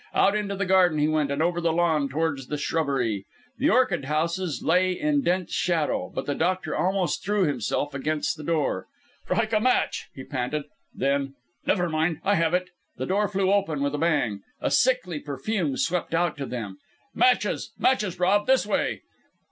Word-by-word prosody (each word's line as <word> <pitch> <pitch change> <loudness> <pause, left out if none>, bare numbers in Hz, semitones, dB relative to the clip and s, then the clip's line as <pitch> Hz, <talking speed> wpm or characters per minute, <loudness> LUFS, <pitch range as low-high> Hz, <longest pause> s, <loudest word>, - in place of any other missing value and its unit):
Out 200 - +4
into 205 -1 -1
the 200 +1 -1
garden 185 -4 +4
he 150 0 +2
went 155 -2 +1
and 140 +3 0
over 175 0 0
the 170 -1 +2
lawn 160 -4 +1
towards 145 -2 -2
the 150 - -3
shrubbery. 135 -10 -1 0.4
The 285 +4 +3
orchid 210 - +2
houses 165 +3 -1
lay 180 +3 +3
in 295 +6 +1
dense 180 -5 0
shadow; 165 -4 0
but - - -4
the 145 - -1
doctor 185 +5 -1
almost 185 0 0
threw 205 0 +1
himself 145 +1 -1
against 150 +3 -1
the 155 - -9
door. 150 - -1 0.4
"Strike 225 0 0
a 215 - +4
match!" 255 +3 +1
he 130 - -7
panted. 130 +3 -3 0.3
Then 140 0 -1 0.3
"Never 180 -3 +2
mind 160 0 0
I 200 - +2
have 165 -2 +2
it!" 180 0 -2 0.3
The - - -3
door 205 +3 +1
flew 195 -1 +1
open 165 -8 0
with 140 0 0
a 145 - -2
bang. 120 -11 +1 0.2
A - - -1
sickly 180 - +2
perfume 145 +2 -2
swept 170 -1 -1
out 170 -1 +1
to 140 -2 -4
them. 105 -6 -6 0.3
"Matches! 250 -1 +2
matches, 210 -9 +1
Rob! 200 +4 +3
this 265 -3 +4
way!" 210 - -1
165 Hz, 180 wpm, -25 LUFS, 145-190 Hz, 0.4 s, Out